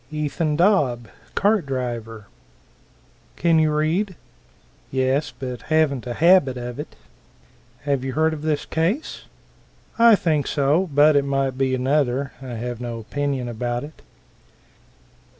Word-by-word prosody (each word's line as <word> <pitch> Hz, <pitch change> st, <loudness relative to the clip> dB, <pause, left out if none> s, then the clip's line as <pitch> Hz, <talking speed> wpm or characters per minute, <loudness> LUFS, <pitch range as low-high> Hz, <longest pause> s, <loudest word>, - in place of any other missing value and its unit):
Ethan 150 Hz, 0 st, -1 dB
Dobb, 145 Hz, -, +2 dB, 0.3 s
cart 205 Hz, -6 st, +2 dB
driver. 120 Hz, -5 st, -4 dB, 1.1 s
"Can 165 Hz, -1 st, +3 dB
you 155 Hz, -1 st, +3 dB
read?" 165 Hz, +6 st, 0 dB, 0.7 s
"Yes, 130 Hz, +3 st, 0 dB
but 125 Hz, -2 st, -6 dB
haven't 155 Hz, -5 st, 0 dB
a 120 Hz, -, -4 dB
habit 165 Hz, -6 st, +4 dB
of 120 Hz, +1 st, -6 dB
it." 150 Hz, -, -7 dB, 0.9 s
"Have 140 Hz, -2 st, -1 dB
you 130 Hz, -1 st, -3 dB
heard 160 Hz, +2 st, +2 dB
of 150 Hz, -, -6 dB
this 155 Hz, -1 st, -1 dB
case?" 180 Hz, -, -2 dB, 0.7 s
"I 230 Hz, -1 st, +8 dB
think 155 Hz, -7 st, 0 dB
so 150 Hz, +6 st, +1 dB
but 145 Hz, +2 st, +5 dB
it 140 Hz, -, +4 dB
might 135 Hz, -1 st, -1 dB
be 130 Hz, 0 st, 0 dB
another. 135 Hz, 0 st, 0 dB
I 125 Hz, -3 st, -6 dB
have 120 Hz, +1 st, -5 dB
no 120 Hz, -1 st, -4 dB
opinion 135 Hz, +2 st, -3 dB
about 120 Hz, +1 st, -3 dB
it." 150 Hz, +1 st, -11 dB
140 Hz, 130 wpm, -22 LUFS, 125-155 Hz, 1.1 s, I